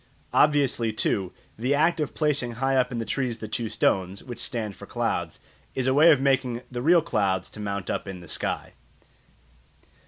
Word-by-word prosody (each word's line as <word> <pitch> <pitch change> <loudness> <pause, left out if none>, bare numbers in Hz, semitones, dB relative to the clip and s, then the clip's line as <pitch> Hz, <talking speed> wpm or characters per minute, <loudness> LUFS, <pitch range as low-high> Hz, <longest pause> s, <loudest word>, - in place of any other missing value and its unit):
Obviously, 140 -6 +3
too, 100 -3 0 0.3
the 130 +5 +1
act 165 +3 +2
of 150 - -2
placing 145 -6 +1
high 135 +3 0
up 130 -1 +2
in 115 -2 -3
trees 125 -3 -2
the 110 - -7
two 110 +1 -3
stones, 95 -1 0
which 120 -2 -8
stand 110 -6 -4
for - - -11
clouds, - - -2 0.4
is 130 - 0
a 130 - +3
way 155 +4 +7
of 145 - +4
making 130 -3 +1
the 120 -1 -4
real 165 +4 +5
clouds 95 - 0
to - - -11
mount 100 -2 -3
up - - -3
in 95 -2 -6
the 85 - -12
sky. - - -3
120 Hz, 185 wpm, -26 LUFS, 105-140 Hz, 0.4 s, way